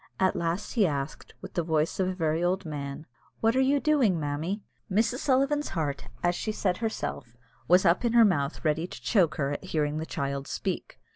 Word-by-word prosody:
At 190 Hz, 0 st, +3 dB
last 170 Hz, +3 st, -2 dB
he 215 Hz, -6 st, +3 dB
asked, 140 Hz, -1 st, -4 dB
with -, -, -9 dB
the 175 Hz, -, +1 dB
voice 160 Hz, +1 st, 0 dB
of 185 Hz, -, +2 dB
a 185 Hz, -, -2 dB
very 160 Hz, -1 st, 0 dB
old 185 Hz, +2 st, 0 dB
man, 145 Hz, -1 st, -5 dB, 0.3 s
"What 225 Hz, +1 st, +2 dB
are 260 Hz, -, +4 dB
you 275 Hz, +2 st, +3 dB
doing, 270 Hz, -, +3 dB
mammy?" 155 Hz, +8 st, -2 dB, 0.3 s
Mrs. 225 Hz, +5 st, +2 dB
Sullivan's 280 Hz, +2 st, +2 dB
heart, 145 Hz, -3 st, -2 dB, 0.2 s
as 175 Hz, 0 st, +3 dB
she 215 Hz, -, -2 dB
said 185 Hz, -4 st, 0 dB
herself, 220 Hz, -, -4 dB, 0.3 s
was 180 Hz, +3 st, +5 dB
up 170 Hz, +5 st, +4 dB
in 235 Hz, -1 st, +1 dB
her 235 Hz, -1 st, +7 dB
mouth 145 Hz, -6 st, 0 dB
ready 160 Hz, +3 st, +1 dB
to -, -, -9 dB
choke 175 Hz, -9 st, +3 dB
her, 140 Hz, -1 st, -1 dB
at 145 Hz, -, -4 dB
hearing 155 Hz, -4 st, -1 dB
the 160 Hz, -, -4 dB
child 140 Hz, 0 st, -3 dB
speak. -, -, -4 dB
175 Hz, 205 wpm, -28 LUFS, 150-215 Hz, 0.3 s, her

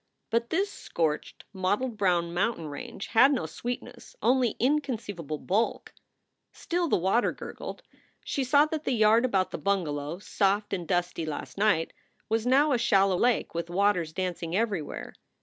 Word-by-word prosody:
But 235 Hz, +1 st, +1 dB
this 395 Hz, +5 st, 0 dB
scorched, 155 Hz, -3 st, -2 dB
mottled 205 Hz, +6 st, -1 dB
brown 175 Hz, -4 st, +1 dB
mountain 180 Hz, -2 st, 0 dB
range 145 Hz, +6 st, -7 dB
had 270 Hz, +5 st, +6 dB
no 260 Hz, -, 0 dB
sweetness, 240 Hz, -, -6 dB
only 250 Hz, -2 st, +2 dB
inconceivable 225 Hz, -, -1 dB
bulk. 205 Hz, +9 st, -1 dB, 0.6 s
Still 345 Hz, 0 st, -2 dB
the -, -, +2 dB
vrater 190 Hz, +7 st, +2 dB
gurgled. -, -, -7 dB, 0.4 s
She 275 Hz, -, -1 dB
saw 285 Hz, +3 st, +5 dB
that 310 Hz, 0 st, -4 dB
the 260 Hz, -, 0 dB
yard 220 Hz, +1 st, +4 dB
about 195 Hz, -6 st, +1 dB
the -, -, -5 dB
bungalow, 160 Hz, -6 st, -1 dB
soft 200 Hz, +1 st, 0 dB
and 175 Hz, -4 st, -3 dB
dusty 175 Hz, -1 st, 0 dB
last 150 Hz, -, -5 dB
night, 200 Hz, -6 st, +2 dB, 0.4 s
was 225 Hz, +1 st, 0 dB
now 285 Hz, +4 st, +4 dB
a 250 Hz, -, +2 dB
shallow 195 Hz, -4 st, +3 dB
lake 240 Hz, +6 st, +1 dB
with 170 Hz, 0 st, -3 dB
waters 180 Hz, -3 st, +1 dB
dancing 175 Hz, -1 st, -3 dB
everywhere. 200 Hz, -8 st, -2 dB
205 Hz, 150 wpm, -28 LUFS, 175-245 Hz, 0.6 s, had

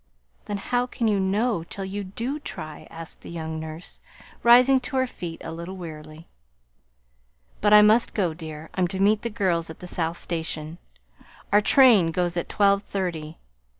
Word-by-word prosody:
"Then 205 Hz, -, -3 dB
how 245 Hz, +4 st, -1 dB
can 235 Hz, -2 st, -2 dB
you 205 Hz, -2 st, +2 dB
know 200 Hz, 0 st, 0 dB
till 195 Hz, +3 st, -7 dB
you 200 Hz, +2 st, -4 dB
do 235 Hz, +10 st, -4 dB
try?" 155 Hz, -, -8 dB
asked 165 Hz, 0 st, -8 dB
the -, -, -10 dB
young 160 Hz, -1 st, -5 dB
nurse, 160 Hz, +2 st, -9 dB, 0.4 s
rising 250 Hz, +3 st, +6 dB
to 255 Hz, +2 st, -6 dB
her 260 Hz, 0 st, +3 dB
feet 175 Hz, -9 st, -7 dB
a -, -, -6 dB
little 170 Hz, +3 st, -7 dB
wearily. 155 Hz, -2 st, -9 dB, 1.3 s
"But 205 Hz, -, +3 dB
I 210 Hz, 0 st, +9 dB
must 220 Hz, +3 st, +4 dB
go, 180 Hz, -6 st, +1 dB
dear. 155 Hz, -1 st, -9 dB
I'm 185 Hz, -1 st, +1 dB
to 190 Hz, +2 st, -5 dB
meet 205 Hz, +2 st, +3 dB
the 235 Hz, -, -3 dB
girls 180 Hz, -7 st, 0 dB
at 160 Hz, -, -9 dB
the -, -, -10 dB
South 170 Hz, -1 st, -3 dB
Station. 160 Hz, -1 st, -5 dB, 0.7 s
Our 205 Hz, -, +6 dB
train 220 Hz, -8 st, +5 dB
goes 175 Hz, +1 st, -1 dB
at 175 Hz, -, -3 dB
twelve 200 Hz, -1 st, +3 dB
thirty. 170 Hz, -6 st, -4 dB
185 Hz, 175 wpm, -25 LUFS, 165-210 Hz, 1.3 s, I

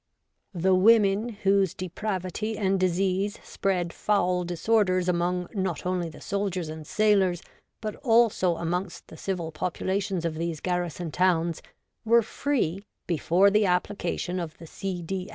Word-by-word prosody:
The 185 Hz, +2 st, +2 dB
women 205 Hz, +2 st, +4 dB
whose 195 Hz, -2 st, +3 dB
depravity 190 Hz, +3 st, -3 dB
and 195 Hz, -2 st, +1 dB
disease 185 Hz, +2 st, 0 dB
spread 180 Hz, -3 st, -1 dB
foul 180 Hz, -3 st, +1 dB
disorders 185 Hz, +1 st, +1 dB
among 180 Hz, 0 st, 0 dB
not 185 Hz, -6 st, -2 dB
only 180 Hz, -2 st, -1 dB
the 155 Hz, -, -13 dB
soldiers 195 Hz, -5 st, -2 dB
and 155 Hz, -1 st, -8 dB
sailors, 195 Hz, -5 st, +2 dB, 0.4 s
but 215 Hz, -2 st, -4 dB
also 225 Hz, -, +3 dB
amongst 175 Hz, +2 st, -3 dB
the 160 Hz, -, -11 dB
civil 175 Hz, -4 st, -3 dB
populations 185 Hz, +2 st, -2 dB
of 165 Hz, -, -1 dB
these 165 Hz, 0 st, -3 dB
garrison 175 Hz, -2 st, -2 dB
towns, 170 Hz, -2 st, +1 dB, 0.4 s
were 230 Hz, +1 st, +5 dB
free, 210 Hz, -, -1 dB, 0.2 s
before 175 Hz, +4 st, +3 dB
the 210 Hz, 0 st, +3 dB
application 180 Hz, 0 st, -1 dB
of 165 Hz, -3 st, -6 dB
the 165 Hz, -, -11 dB
C. 180 Hz, +1 st, -5 dB
D. 185 Hz, +2 st, -4 dB
185 Hz, 135 wpm, -26 LUFS, 175-200 Hz, 0.4 s, were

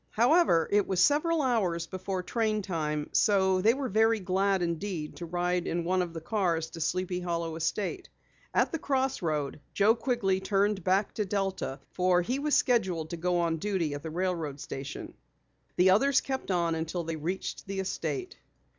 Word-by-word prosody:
However, 235 Hz, -, +4 dB
it 205 Hz, 0 st, +3 dB
was 190 Hz, -2 st, 0 dB
several 300 Hz, -, +3 dB
hours 190 Hz, -10 st, +1 dB
before 185 Hz, +1 st, -4 dB
train 215 Hz, +1 st, 0 dB
time, 150 Hz, -5 st, -2 dB
so 190 Hz, -3 st, +3 dB
they 225 Hz, +5 st, +4 dB
were 270 Hz, -1 st, -2 dB
very 220 Hz, +1 st, +3 dB
glad 190 Hz, 0 st, +1 dB
indeed 170 Hz, -2 st, -3 dB
to 170 Hz, -, -6 dB
ride 180 Hz, +1 st, -1 dB
in 170 Hz, 0 st, -1 dB
one 185 Hz, +2 st, +1 dB
of 175 Hz, -2 st, -3 dB
the 165 Hz, -, -6 dB
cars 170 Hz, -4 st, -1 dB
to 165 Hz, 0 st, -8 dB
Sleepy 180 Hz, +2 st, -1 dB
Hollow 170 Hz, -2 st, -2 dB
estate. 195 Hz, -, -2 dB, 0.4 s
At -, -, +2 dB
the 325 Hz, -, -2 dB
crossroad 175 Hz, -, -1 dB, 0.2 s
Joe 210 Hz, +2 st, +5 dB
Quigley 230 Hz, -6 st, 0 dB
turned 195 Hz, 0 st, +1 dB
back 190 Hz, +3 st, +1 dB
to 210 Hz, -, -1 dB
Delta 195 Hz, -7 st, -2 dB
for 180 Hz, -1 st, +2 dB
he 250 Hz, +9 st, -1 dB
was 295 Hz, +1 st, +1 dB
scheduled 185 Hz, -, +1 dB
to 170 Hz, -, -3 dB
go 175 Hz, +1 st, +1 dB
on 165 Hz, -1 st, 0 dB
duty 175 Hz, -4 st, -1 dB
at 145 Hz, -, -5 dB
the 160 Hz, -, -6 dB
railroad 165 Hz, -4 st, -2 dB
station. 135 Hz, 0 st, -6 dB, 0.6 s
The 185 Hz, +1 st, +5 dB
others 270 Hz, +7 st, +4 dB
kept 265 Hz, -5 st, -4 dB
on 170 Hz, -3 st, +1 dB
until 160 Hz, +2 st, -3 dB
they 165 Hz, 0 st, -3 dB
reached 180 Hz, +7 st, -4 dB
the 195 Hz, 0 st, -3 dB
estate. 365 Hz, -, -3 dB
185 Hz, 175 wpm, -29 LUFS, 170-210 Hz, 0.6 s, Joe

